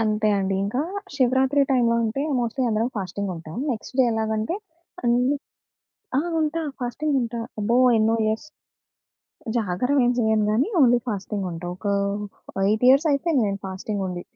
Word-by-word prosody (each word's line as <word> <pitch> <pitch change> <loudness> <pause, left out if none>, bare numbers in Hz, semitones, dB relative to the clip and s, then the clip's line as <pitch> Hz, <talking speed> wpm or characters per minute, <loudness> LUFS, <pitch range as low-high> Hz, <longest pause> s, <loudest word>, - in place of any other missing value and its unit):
అంతే 215 -1 +1
అండి. 195 0 0
ఇంకా 230 +7 -1 0.4
శివరాత్రి 265 +2 +3
టైంలో 240 -3 +3
ఉంటే 225 +5 -1 0.2
మోస్ట్‌లీ 240 +2 -1
అందరం 220 +2 +1
ఫాస్టింగ్ 200 0 -3
ఉంటాం. 160 -1 -9 0.2
నెక్స్ట్ 235 +2 -8
డే - - +6
ఎలాగంటే 220 - -1 0.5
అన్ని 245 +4 +2 0.8
ఆ! - - +1 0.2
ఉంటా. 315 +1 0 0.2
ఫాస్టింగ్ 280 +4 -1
ఉంటా. 235 0 -3 0.2
అబ్బో! 220 +3 +1 0.2
ఎన్నో 220 +1 +3
ఇయర్స్. 220 0 0 1.2
జాగరమేం 245 +6 +2
జేయను 220 -2 +2
గాని, 235 - +2
ఓన్లీ 245 -2 +6
ఫాస్టింగ్ 200 -1 -3
ఉంటా. 170 +1 -6
ఒక 205 - -8 0.8
8 215 +4 +2
ఇయర్స్ 275 +5 +5
అయిపోయింది 280 -3 +1
నేను 195 0 -3
ఫాస్టింగ్ 195 +2 -4
ఉండి, 175 -1 -5
225 Hz, 140 wpm, -24 LUFS, 210-260 Hz, 1.2 s, డే